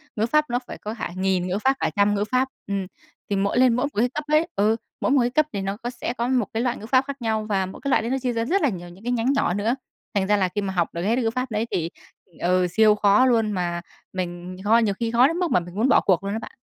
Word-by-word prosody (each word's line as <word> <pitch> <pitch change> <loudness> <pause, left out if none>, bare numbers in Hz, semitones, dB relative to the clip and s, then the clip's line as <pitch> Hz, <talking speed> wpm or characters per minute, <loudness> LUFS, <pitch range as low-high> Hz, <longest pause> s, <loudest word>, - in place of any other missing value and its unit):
ngữ 215 - +1
pháp 305 +4 +2
nó 245 +1 0
phải - - -7
cỡ 210 - -6
hạ 225 - -4
nghìn 185 -1 0
ngữ 185 +2 -1
pháp, 265 +1 +4
cả - - +1
trăm 205 0 +3
ngữ 200 - 0
pháp. 255 +1 +2 0.2
Ừm. 195 -2 -2 0.4
Thì 200 - 0
mỗi 200 +4 0
lên 255 -2 +5
mỗi 250 +3 +1
một 280 -7 -4
cái 245 +2 +3
cấp 300 - -3
ấy 305 +2 +3
ừ, 210 +3 +3 0.3
mỗi - - +1
một 275 -2 +4
cái 240 - +1
cấp 305 +4 +2
thì 200 - -2
nó 195 +1 -3
có 240 +2 -5
sẽ 245 - -4
có 235 - 0
một 250 -4 +2
cái 225 - 0
loại 245 -1 0
ngữ 215 - -9
pháp 255 +3 +3
khác 280 -2 -6
nhau 220 -1 -1
và 195 -2 +1
mỗi 190 - -10
cái 280 - -1
loại 260 - +3
đấy 230 - -3
nó 270 - +1
chia 250 -2 -1
ra 230 0 -1
rất 385 +9 +1
là 295 - +3
nhiều 175 -4 -7
những 185 +5 -15
cái 245 - -2
nhánh 245 +2 +1
nhỏ 275 -10 +1
nữa. 215 +5 0 0.4
Thành 195 -3 +1
ra 210 0 +3
là 185 -2 +1
khi 205 - 0
mà 190 -1 -3
học 175 -2 +1
được 170 - -4
hết 220 +6 +1
cái 250 - 0
ngữ 225 - +2
pháp 255 0 -3
đấy 215 +2 0
thì, 165 -1 -1 0.5
ừ, 180 +1 +2
siêu 215 -1 +5
khó 205 +4 +4
luôn, 225 -4 +2
mà 175 -2 -2 0.3
mình 180 0 -5
kho 220 +3 +5
nhiều 220 -4 +2
khi 230 -1 -1
khó 240 +3 +5
đến 330 +4 -2
mức 355 -2 0
mà - - +4
mình 175 +1 -10
muốn 230 +6 +2
bỏ - - +5
cuộc 185 -1 +2
luôn 200 - -3
á 220 - -2
bạn. - - -10
220 Hz, 315 wpm, -24 LUFS, 195-250 Hz, 0.5 s, lên